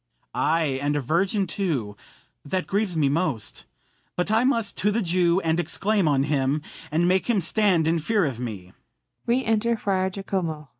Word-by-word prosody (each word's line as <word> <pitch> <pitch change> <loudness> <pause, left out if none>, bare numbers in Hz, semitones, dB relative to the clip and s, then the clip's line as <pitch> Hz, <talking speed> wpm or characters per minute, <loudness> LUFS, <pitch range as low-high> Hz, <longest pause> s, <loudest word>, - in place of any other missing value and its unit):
Ay, 155 -4 +1
and 145 +1 0
a - - +1
virgin 185 - +1
too; 150 - -2 0.5
that 185 +5 -2
grieves 195 -4 -1
me 150 -3 +3
most. 140 - -2 0.5
But 180 +4 -1
I 220 +2 +3
must 230 -6 +1
to 205 - +2
the 215 +2 0
Jew, 175 0 +2
and 165 0 0
exclaim 200 +1 0
on 140 -2 +3
him, 145 0 0 0.3
And 165 +3 +1
make 185 +5 +1
him 225 -4 +3
stand 180 -1 +2
in 165 +1 +2
fear 205 +4 +1
of 130 -5 -3
me. 100 -7 -6
170 Hz, 150 wpm, -24 LUFS, 145-195 Hz, 0.5 s, me